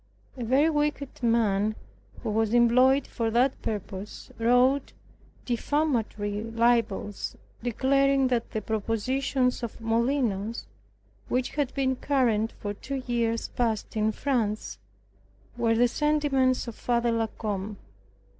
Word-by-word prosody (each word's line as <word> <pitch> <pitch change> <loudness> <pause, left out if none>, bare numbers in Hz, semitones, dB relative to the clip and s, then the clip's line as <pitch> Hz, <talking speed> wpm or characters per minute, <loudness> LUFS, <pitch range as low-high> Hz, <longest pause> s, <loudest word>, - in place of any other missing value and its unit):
A 250 - -5
very 265 +7 +3
wicked 295 -3 -2
man 215 -3 +2 0.5
who - - -1
was 220 +1 +1
employed 255 +3 +5
for 230 -2 -2
that 250 +4 +2
purpose, 205 -1 -6
wrote 250 +4 +3 0.5
defamatory 235 -6 -1
libels, 230 -3 0 0.3
declaring 270 +3 +2
that 240 -2 0
the 220 - -4
propositions 250 +4 0
of 235 -2 -6
Molinos, 230 -2 0 0.6
which 250 0 0
had 285 -3 -1
been 265 -2 +1
current 235 -6 +1
for 205 -1 -5
two 265 +5 -5
year 235 -2 +1 0.2
past 225 -4 -1
in 215 0 +2
France, 220 - -2 0.8
were 230 -1 +2
the 245 +2 +4
sentiments 275 -3 +1
of 235 - -5
Father 235 +1 0
La 225 -1 +1
Combe. 210 -1 -4
235 Hz, 115 wpm, -27 LUFS, 220-260 Hz, 0.8 s, employed